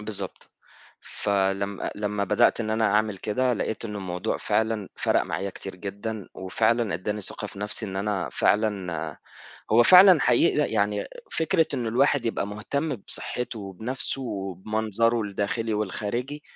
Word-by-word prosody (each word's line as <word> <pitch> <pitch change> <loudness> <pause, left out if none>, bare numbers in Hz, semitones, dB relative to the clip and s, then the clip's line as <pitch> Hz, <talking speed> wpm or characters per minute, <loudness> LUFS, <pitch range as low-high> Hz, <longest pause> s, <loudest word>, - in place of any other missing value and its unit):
بالضبط 100 -3 -4 0.5
فلم 100 0 -1
آآ - - -2
لمّا 105 -1 -1
بدأت 105 +3 +3
إن 110 -1 -2
أنا 110 +1 +1
أعمل 105 -1 +2
كده 125 +6 0
لقيت 110 0 -3
إنه 105 -2 -4
الموضوع 90 -2 -2
فعلًا 110 -3 0
فرَق - - +2
معايا 100 - -3
كتير 95 0 -9
جدًا، 100 +2 -5
وفعلًا 110 +2 +1
ادّاني 105 +5 -3
ثقة 95 - -4
في - - -11
نَفْسي، 105 +2 -1
إن 95 -1 -5
أنا 100 -1 -1
فعلًا 105 -4 +1
آآ 80 -2 -5 0.5
هو 115 +2 +7
فعلًا 185 +2 +8
حقيقي 125 +6 +3
ي - - -7
يعني 105 -1 0 0.2
فكرة 160 0 +2
إنه 120 -4 -1
الواحد 135 +3 +2
يبقى 115 - -1
مهتم 135 +8 -2
بصحته 120 +3 -5
وبنَفْسه 110 +8 -3
وبمنظره 110 +2 -1
الداخلي 105 +2 -2
والخارجي، 115 +7 -3
105 Hz, 150 wpm, -26 LUFS, 100-115 Hz, 0.5 s, فعلًا